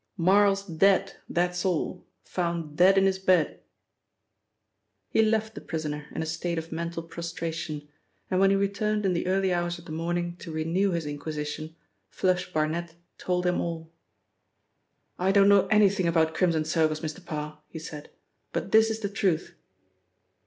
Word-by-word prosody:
"Marl's 195 +2 +4
dead, 195 +2 +3 0.2
that's 180 0 0
all; 180 -1 -2 0.2
found 170 -4 -3
dead 185 +4 +6
in 195 - +5
his 190 0 +1
bed." 185 -4 +2 1.5
He - - +4
left 220 0 +1
the - - -8
prisoner 150 -2 -4
in - - -1
a - - -4
state 165 +2 -2
of 165 0 -5
mental 170 0 -4
prostration, 165 -2 -5 0.4
and 185 - 0
when 195 0 +5
he 195 - +4
returned 200 +1 0
in 190 - +2
the 175 +1 -1
early 190 0 +2
hours 175 0 -1
of 170 - -14
the - - -9
morning 175 +2 -2
to 170 - -8
renew 165 +5 +1
his 170 -3 -2
inquisition, 150 +1 -5 0.3
'Flush' 185 -1 0
Barnet 160 +1 -1 0.2
told 180 0 -1
him 180 0 +1
all. 165 -1 -5 1.3
"I 185 +2 +2
don't 200 0 +5
know 200 -1 +5
anything 200 -4 +4
about 160 -1 +2
Crimson 165 -2 +1
Circles, 155 -1 +1
Mr. 160 +4 -5
Parr," 150 -2 -6
he 160 - -9
said, 155 -2 -8 0.4
"but - - -3
this 220 0 +6
is 220 0 -3
the 205 - -1
truth." 190 -5 0
175 Hz, 160 wpm, -27 LUFS, 160-195 Hz, 1.5 s, dead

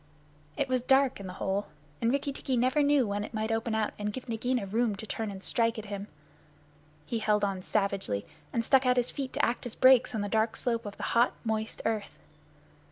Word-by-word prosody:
It 280 - +1
was 255 -1 +1
dark 265 0 +3
in 195 - -7
the 180 - -6
hole; 195 +2 -1 0.3
and 230 - +3
Rikki 280 +1 -1
tikki 265 -2 -2
never 255 +5 +3
knew 285 -3 +4
when 205 0 -2
it 220 - -7
might 220 +1 -1
open 225 0 0
out 220 -1 0
and 210 0 -1
give 255 +4 -7
Nagaina 235 0 -1
room 220 +2 0
to 210 - -8
turn 220 0 -3
and 195 -1 -8
strike 230 -1 +1
at 215 - -5
him. 200 +1 -5 1.0
He 235 - -2
held 210 -1 +2
on 195 -2 -2
savagely, 195 - -1 0.3
and 230 -1 -1
stuck 265 0 +4
out 250 0 +4
his 245 -1 +1
feet 270 -3 -4
to - - +2
act 245 +1 -2
as 230 - -7
brakes 255 -2 +5
on 215 - -1
the 205 - -1
dark 220 +2 +1
slope 230 -3 -1
of 200 - -8
the - - -6
hot, 235 +1 +4
moist 220 0 -2
earth. 215 -3 -2
225 Hz, 225 wpm, -29 LUFS, 205-250 Hz, 1.0 s, brakes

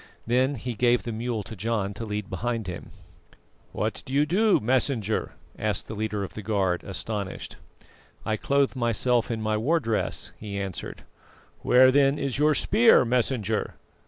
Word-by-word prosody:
Then 130 +4 +2
he 125 +1 -4
gave 120 +2 +2
the 120 - -4
mule 115 -1 -3
to 110 - -9
John 105 -1 -2
to 115 +3 -6
lead 105 -2 -4
behind 115 +3 -3
him. 90 -2 -7 0.8
"What - - -3
do - - -10
you, 180 +10 +3
Messenger?" 120 -2 0 0.3
asked 105 -2 -1
the - - -6
leader 105 -1 -2
of 95 - -7
the 110 - -6
guard, 95 -4 0
astonished. 100 0 -5 0.7
"I 110 - 0
clothe 140 +5 +1
myself 120 0 +1
in 110 -2 -3
my 110 0 0
war 155 +10 +2
dress," 115 -6 -2
he 100 -2 -5
answered. 95 -3 -6 0.6
"Where 130 +1 +6
then 140 +1 +3
is 135 -2 -2
your 150 0 +4
spear, 225 - +5
Messenger?" 115 -3 0
115 Hz, 160 wpm, -26 LUFS, 105-130 Hz, 0.8 s, Where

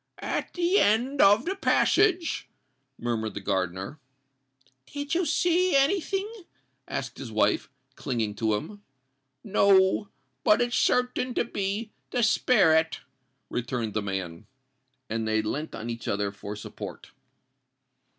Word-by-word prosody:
"At - - -3
the 355 +3 +3
end 245 +7 +2
of 205 +5 +6
the 380 +3 -1
passage——" 370 -3 +2 0.5
murmured 110 -3 -2
the - - -3
gardener. 95 - -2 0.9
"Do 285 0 -5
you 340 +4 0
see 355 -1 +2
any 280 +8 +4
thing?" 390 +4 -2 0.6
asked - - -5
his - - -7
wife, - - +1 0.3
clinging 115 -6 -2
to 110 -1 +1
him. 200 - -6 0.6
"No—but 190 - +2
it's 240 -1 0
certain 250 +1 +1
to - - +1
be 205 +1 -3 0.2
the 245 - 0
sperret," 165 -8 +3 0.5
returned 120 -3 -2
the 110 - 0
man. 95 -1 -5 0.6
And 110 0 -2
they 110 0 +1
leant 150 +9 -4
on 110 - -6
each 115 -1 -7
other 100 0 -1
for 100 +1 -7
support. 105 - -9
190 Hz, 125 wpm, -27 LUFS, -, 0.9 s, of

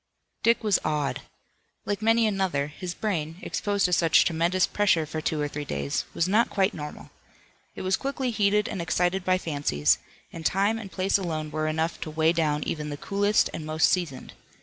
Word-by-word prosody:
Dick 230 0 +3
was 210 -3 +3
awed. 150 -2 -1 0.6
Like 205 0 -2
many 225 +1 +4
another 190 -9 0
his 175 +4 -6
brain 165 -6 -2
exposed 200 -1 0
to 180 - +1
such 165 -2 +5
tremendous 175 +2 +2
pressure 195 -6 +2
for 155 +1 -5
two 155 0 -1
or 145 - 0
three 145 0 -5
days, 70 - -2
was 165 - +1
not 215 +5 +3
quite 195 +1 +1
normal. 150 -1 -8 0.6
It - - -6
was 185 0 +1
quickly 270 -2 -2
heated 210 -1 +2
and 185 - -4
excited 175 +3 0
by 185 0 +2
fancies, 140 - +1 0.3
and 165 - -7
time 200 +6 +1
and 200 -4 -9
place 195 +1 +1
alone 155 -4 -3
were 155 0 -1
enough 160 +2 -1
to - - -4
weigh 160 +1 +2
down 150 -3 0
even 150 -1 -3
the 145 - -5
coolest 205 +5 +1
and 160 - -5
most 155 +1 +2
seasoned. 165 -8 -2
170 Hz, 190 wpm, -26 LUFS, 155-200 Hz, 0.6 s, such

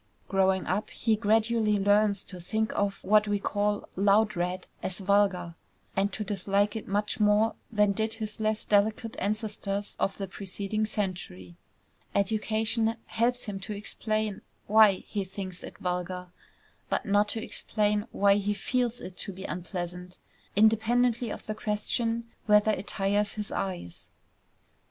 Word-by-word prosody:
Growing 190 -1 +2
up 200 +4 -1
he 225 -1 +1
gradually 220 0 +2
learns 205 0 +3
to 185 - -9
think 220 +5 -1
of 200 -1 -1
what 210 +1 +4
we 205 0 +1
call 205 +1 -1
"loud 205 +2 +3
red" 180 +1 -2 0.2
as 185 - -2
vulgar, 195 -3 +2 0.4
and 195 +1 +2
to 215 - -3
dislike 200 +1 0
it 220 - -5
much 205 +4 -1
more 210 +1 +4 0.2
than 210 -2 +3
did 220 +2 0
his 215 -1 -5
less 215 0 0
delicate 215 +2 +2
ancestors 205 -1 -2
of 195 - 0
the 195 - -3
preceding 200 +3 -3
century. 175 - -4 0.6
Education 220 +2 +1
helps 240 +2 0
him 200 -3 -5
to 200 +2 -5
explain 215 0 -2 0.2
why 215 -1 +7
he 200 +2 -4
thinks 190 -1 -7
it - - -9
vulgar, 180 0 -3 0.6
but - - 0
not 205 +1 +3
to 225 0 -3
explain 210 0 -1
why 200 0 +4
he 205 0 0
feels 245 +3 -1
it 185 - -8
to - - -4
be 190 0 -9
unpleasant, 180 -1 -5 0.4
independently 225 +3 +3
of - - -6
the 215 - -2
question 225 +2 -1 0.2
whether 210 0 +5
it 200 -1 -3
tires 205 +1 +1
his 210 -1 -5
eyes. 90 - -4
205 Hz, 145 wpm, -28 LUFS, 195-215 Hz, 0.6 s, why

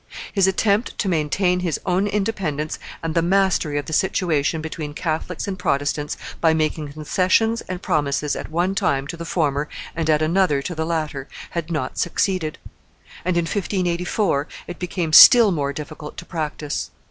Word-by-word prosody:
His 195 -2 +4
attempt 200 +4 +1
to 205 - -1
maintain 180 +2 +1
his 175 -4 -1
own 185 +3 +1
independence 195 -8 -2 0.2
and 165 -1 -2
the 165 - +2
mastery 180 -4 +2
of 145 - -2
the 160 - -6
situation 160 -3 +1
between 155 -2 -6
Catholics 160 +3 -3
and 190 -1 -4
Protestants, 145 +1 -1 0.2
by 160 -1 +4
making 155 -2 -1
concessions 185 +9 +1
and 185 0 -5
promises 150 -3 0
at - - -6
one 175 +4 0
time 140 -9 0
to 145 - -6
the 170 0 -7
former 150 -3 0 0.3
and 165 -1 -1
at 155 0 +3
another 155 -4 +2
to 175 - -4
the 160 -1 -3
latter, 155 -5 -2 0.2
had 170 -1 -3
not 150 -6 -3
succeeded; 170 -2 0 0.7
and 180 -1 0
in 170 - +2
1584 180 -3 0 0.2
it 175 - -8
became 175 -3 -3
still 230 +4 +10
more 145 -5 -1
difficult 150 +1 -8
to - - -7
practise. 150 -3 -3
165 Hz, 165 wpm, -22 LUFS, 150-185 Hz, 0.7 s, still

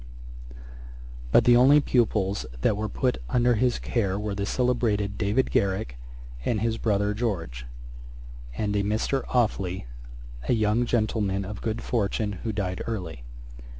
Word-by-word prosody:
But - - +6
the 120 - +6
only 135 +5 +7
pupils 105 - +1
that 105 - +2
were 105 +1 -3
put 125 +4 0
under 125 0 +3
his 120 +2 +2
care 100 -5 -1
were 105 0 -3
the 100 0 -3
celebrated 115 -5 0
David 105 +6 +1
Garrick 95 - 0 0.5
and 110 - 0
his 115 +1 -1
brother 105 -1 +1
George, 85 - -3 0.9
and 105 -1 -1
a 100 - +2
Mr. 110 +6 0
Offely, 100 - 0 0.6
a - - +5
young 110 +2 +2
gentleman 105 -4 0
of 105 +2 -7
good 110 -1 -3
fortune 105 -3 -1
who 115 - -2
died 95 -3 -3
early. 90 - -4
105 Hz, 140 wpm, -26 LUFS, 100-120 Hz, 0.9 s, only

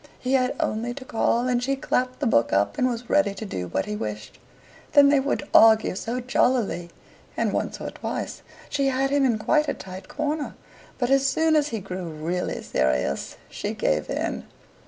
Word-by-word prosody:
He 255 +1 -2
had 255 -1 +2
only 235 +3 -1
to 270 - -9
call, 235 +1 +1
and 245 -1 +1
she 275 +2 0
clapped 255 0 -1
the - - +1
book 115 - +3
up 100 +1 +1
and 255 - +3
was 240 -1 -4
ready 290 -9 +2
to 220 - -6
do 90 - -4
what 95 +2 -1
he 105 - -4
wished. 105 +2 -6 0.5
Then 285 -1 +7
they 285 -1 +4
would 280 +1 -2
argue 220 -1 +6
so 230 +6 -3
jollily, 245 -8 +1 0.5
and - - 0
once - - -2
or - - -5
twice - - -5 0.3
she 280 -1 0
had 270 +1 +1
him 285 -1 +3
in 235 -4 +2
quite 300 +7 +2
a - - -1
tight 185 0 -9
corner, 300 0 -3 0.4
but 250 0 0
as 275 0 +4
soon 320 +3 +2
as 300 -1 +3
he 230 -6 -3
grew 185 -2 -6
really 165 +3 -3
serious, 65 +1 -1
she - - -5
gave 75 0 0
in. - - -2
240 Hz, 195 wpm, -25 LUFS, 180-270 Hz, 0.5 s, Then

